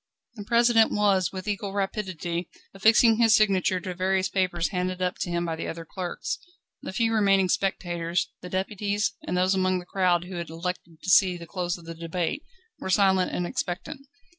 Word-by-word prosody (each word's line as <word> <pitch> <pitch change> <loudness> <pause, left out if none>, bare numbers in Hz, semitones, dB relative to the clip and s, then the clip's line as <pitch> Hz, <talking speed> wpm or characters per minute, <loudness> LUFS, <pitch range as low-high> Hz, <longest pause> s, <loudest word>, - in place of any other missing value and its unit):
The 210 -4 -9
President 235 0 +4
was, 200 -3 +2
with 185 0 -7
equal 200 -1 -3
rapidity, 185 -4 -3 0.2
affixing 220 +3 +5
his 225 -1 +5
signature 190 -3 +2
to 185 -1 -5
various 185 +1 0
papers 180 -3 0
handed 185 -1 -2
up 180 0 -2
to - - -2
him 170 0 -1
by 165 -1 -2
the 160 - -5
other 165 0 -6
clerks. 180 +2 -4 0.4
The - - -6
few 225 +4 +1
remaining 195 -3 +3
spectators, 175 -2 -1
the 180 - -8
deputies, 205 +2 -1
and 180 - -1
those 185 +1 +3
among 185 -1 +1
the 175 - -7
crowd 180 -2 +1
who 180 0 -7
had 170 -2 -5
elected 165 -1 -6
to 185 - -4
see 185 -2 +5
the 170 - -9
close 175 0 -3
of 170 - -15
the 165 - -6
debate, 165 - -3 0.4
were - - -5
silent 190 -1 +3
and 180 - -2
expectant. 180 +11 -4
185 Hz, 190 wpm, -26 LUFS, 175-200 Hz, 0.4 s, affixing